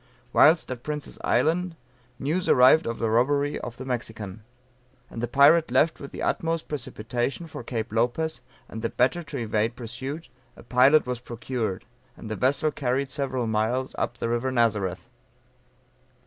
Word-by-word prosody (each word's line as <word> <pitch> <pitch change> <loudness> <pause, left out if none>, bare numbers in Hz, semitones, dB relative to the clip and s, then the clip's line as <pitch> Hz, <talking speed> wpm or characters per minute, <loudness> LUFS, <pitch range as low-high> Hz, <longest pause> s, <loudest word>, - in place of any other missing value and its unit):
Whilst 160 -2 +5
at 125 -2 -5
Prince's 150 +1 -5
Island 175 +2 +1 0.4
news 160 +8 -1
arrived 130 +5 +6
of 115 - -2
the 115 -1 -1
robbery 140 +5 +2
of 120 -1 -7
the 130 - -7
Mexican. 110 -5 -5 0.7
And 115 - -6
the 120 - -1
pirate 145 +6 +5
left 130 +6 +2
with 140 - -8
the - - -6
utmost 165 0 -1
precipitation 120 +2 -3
for 160 - -8
Cape 110 -3 -4
Lopez, 125 +8 0 0.3
and 110 - -7
the 115 - -1
better 135 +8 +1
to 145 -3 -7
evade 110 0 -1
pursuit, 130 +7 -6 0.3
a - - -14
pilot 130 +5 +5
was 125 -1 -3
procured; 120 -4 -4 0.3
and 110 - -8
the - - -1
vessel 140 +7 +1
carried 135 0 -1
several 130 -3 -2
miles 115 +4 0
up 120 - -2
the - - -2
river 120 +3 0
Nazareth. 105 -6 0
125 Hz, 160 wpm, -26 LUFS, 115-145 Hz, 0.7 s, arrived